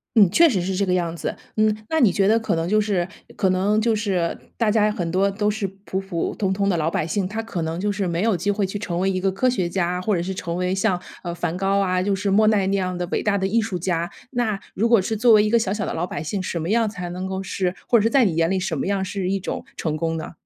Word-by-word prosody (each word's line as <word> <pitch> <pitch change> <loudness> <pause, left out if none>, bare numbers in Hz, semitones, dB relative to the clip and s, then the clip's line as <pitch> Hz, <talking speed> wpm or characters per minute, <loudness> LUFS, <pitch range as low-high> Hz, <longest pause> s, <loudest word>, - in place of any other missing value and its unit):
嗯， 205 -5 +7
确 335 +7 +6
实 200 -8 0
是 185 +1 -2
这 200 +2 +1
个 180 - +2
样 170 -2 0
子。 160 - -4 0.2
嗯， 215 -1 +3
那 320 - +1
你 225 -9 +5
觉 195 +1 +2
得 225 +2 +4
可 220 - -1
能 165 +1 -1
就 215 +3 +3
是 195 -4 0 0.3
可 190 -3 +1
能 195 +3 +2
就 225 0 +2
是 190 -6 0 0.2
大 225 -3 +2
家 215 -1 +3
很 175 -5 -3
多 195 +2 +2
都 205 +1 0
是 210 -1 -2 0.2
普 190 - -2
普 190 -4 -3
通 195 -2 0
通 200 +1 0
的 195 - +2
老 160 +1 +1
百 155 - -1
姓， 185 +3 -1
他 220 +3 -4
可 190 -6 -4
能 160 +1 -3
就 205 +2 0
是 200 -2 -2
没 170 +2 -1
有 225 -3 +2
机 180 +4 -2
会 200 -1 +1
去 195 +2 -4
成 175 -4 -3
为 190 +1 +1
一 185 -1 -1
个 195 0 +1
科 195 +7 0
学 190 -9 0
家， 180 0 -1
或 205 +1 +1
者 170 - -1
是 190 +2 -3
成 170 -2 -4
为 180 +1 0
像， 195 -2 +1 0.2
呃， 175 -1 -3
梵 175 0 -2
高 195 +1 +1
啊， 185 -2 +1
就 195 +1 +1
是 200 +1 -1
莫 215 +2 +4
奈 210 -3 +3
那 195 - +1
样 185 -2 -1
的 175 - -2
伟 - - 0
大 205 -1 +1
的 190 - -1
艺 225 +4 +2
术 215 -5 -3
家。 170 -1 -1 0.2
那 225 -6 -1
如 230 +4 +1
果 235 - +6
是 220 +4 -1
作 230 +1 +5
为 210 - +6
一 210 - +1
个 235 +1 +4
小 195 -3 -1
小 210 0 -1
的 - - -3
老 175 +2 -2
百 145 - -5
姓， 190 +5 -3
什 180 -1 -3
么 165 +3 -3
样 225 -1 +2
才 180 -4 -6
能 185 +2 -4
够 190 0 -3
是 185 -1 -2
或 235 - +5
者 - - +2
是 225 - +3
在 255 -1 +4
你 175 - 0
眼 165 0 +2
里 190 0 +1
什 180 -3 -2
么 - - -2
样 195 -1 0
是 185 -1 -3
一 195 0 0
种 - - -4
成 155 -2 -2
功 165 +1 -1
呢？ 160 - -6
195 Hz, 330 characters per minute, -22 LUFS, 180-210 Hz, 0.3 s, 嗯